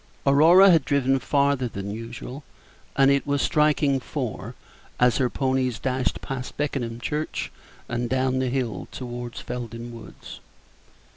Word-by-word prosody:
Aurora 165 +8 +7
had 165 -4 +4
driven 135 -1 +2
farther 140 -1 +1
than 100 -2 -6
usual, 120 +5 -7 0.5
and 135 0 +5
it 140 +1 +1
was 145 0 +1
striking 150 -2 +2
four 125 - -5 0.4
as 125 -1 +4
her 130 -3 +1
ponies 130 -3 0
dashed 130 0 -1
past 125 -2 -6
Beckenham 125 -6 -2
church 150 +6 -3 0.4
and 120 0 -2
down 130 0 +1
the 130 -1 0
hill 125 -3 -2
toward 120 -1 -6
Felden 120 -1 -6
Woods. 115 -4 -11
130 Hz, 135 wpm, -24 LUFS, 120-140 Hz, 0.5 s, Aurora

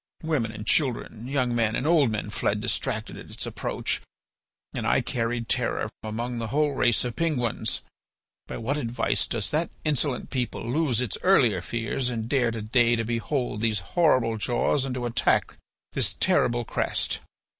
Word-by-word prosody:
Women 145 -9 0
and 105 -1 -7
children, 120 -5 0
young 130 -3 +1
men 110 -2 +2
and 130 - -1
old 155 -5 +5
men 110 -1 -3
fled - - 0
distracted - - -2
at - - -10
its - - -4
approach, - - -2 0.7
and - - -2
I - - +4
carried 115 0 -1
terror - - 0
among 115 +3 -3
the 115 - -2
whole 150 +5 +2
race 120 -4 +2
of 120 - -3
Penguins. 140 -9 -1 0.7
By - - -5
what 135 +6 -1
advice 115 -4 0
does 110 -4 -2
that 160 +3 +1 0.2
insolent 145 -3 0
people 125 -3 -2
lose 130 -2 +1
its 125 -5 -2
earlier 125 - +4
fears 115 +5 -1
and 115 -2 -3
dare 125 -2 +2
to 115 -2 -4
day 120 +2 +4
to 115 - -1
behold 120 0 -1
these 110 -4 +1
horrible 130 -10 +3
jaws 125 +5 +1
and 130 -2 -3
to 125 -1 -2
attack 120 - +1 0.4
this - - +1
terrible 120 0 +2
crest?" - - -1
120 Hz, 165 wpm, -26 LUFS, 115-135 Hz, 0.7 s, old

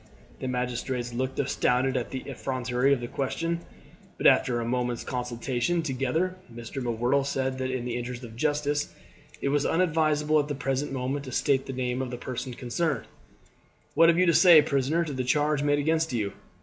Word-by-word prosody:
The 130 - -4
magistrates 125 -1 -2
looked 130 +2 -2
astounded 130 -1 +1
at 125 -2 -1
the 130 - -4
effrontery 130 -1 -1
of 135 -3 +2
the 120 - -4
question, 165 +7 -2 0.6
but - - -5
after 120 -1 +5
a 115 - -2
moment's 125 0 -1
consultation 125 +6 -1
together 155 +6 -1 0.2
Mr. 120 +4 -7
M'Whirtle 120 +3 +1
said 130 -1 -2
that 130 0 -1
in 130 -2 -3
the 120 -1 -3
interest 120 +1 -5
of 115 -2 -9
justice 145 +2 -1 0.5
it 140 - +1
was 145 0 +2
unadvisable 155 -3 +2
at 145 - 0
the 145 - -3
present 135 +1 -2
moment 135 +2 -2
to 130 - -7
state 135 +1 +1
the 135 - -4
name 125 0 -2
of 130 - -3
the 125 - -5
person 125 0 -5
concerned. 140 +5 -2 0.9
"What 165 0 +6
have 170 - +4
you 185 - +4
to 170 - +4
say, 170 -3 +8
prisoner, 140 +5 +1
to 150 - -5
the 130 -1 -2
charge 150 +3 +1
made 145 0 +2
against 160 +2 +1
you? 105 -4 -1
130 Hz, 190 wpm, -27 LUFS, 125-145 Hz, 0.9 s, say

